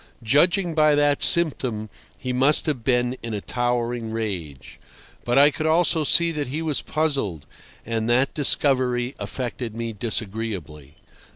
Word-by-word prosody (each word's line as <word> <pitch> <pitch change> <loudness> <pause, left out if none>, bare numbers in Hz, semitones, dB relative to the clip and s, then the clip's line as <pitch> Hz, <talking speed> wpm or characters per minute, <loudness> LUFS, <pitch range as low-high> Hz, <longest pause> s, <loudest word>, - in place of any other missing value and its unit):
Judging 170 - +3
by 155 -1 +4
that 145 -1 +2
symptom, 130 -10 +2 0.3
he 125 -2 -4
must 135 +4 +3
have 140 -7 -2
been 125 0 +1
in 115 -2 -5
a - - -3
towering 120 0 -2
rage. 95 - -6 0.5
But 120 +1 +1
I 145 +2 +7
could 155 +2 -3
also 160 0 +2
see 170 +3 +3
that 150 -4 -3
he 150 +6 -4
was 155 -3 -1
puzzled, 135 - -2 0.4
and 115 0 -2
that 130 +3 +2
discovery 130 -3 +1
affected 120 -3 -5
me 115 -1 -4
disagreeably. 100 - -5
125 Hz, 145 wpm, -23 LUFS, 115-150 Hz, 0.5 s, I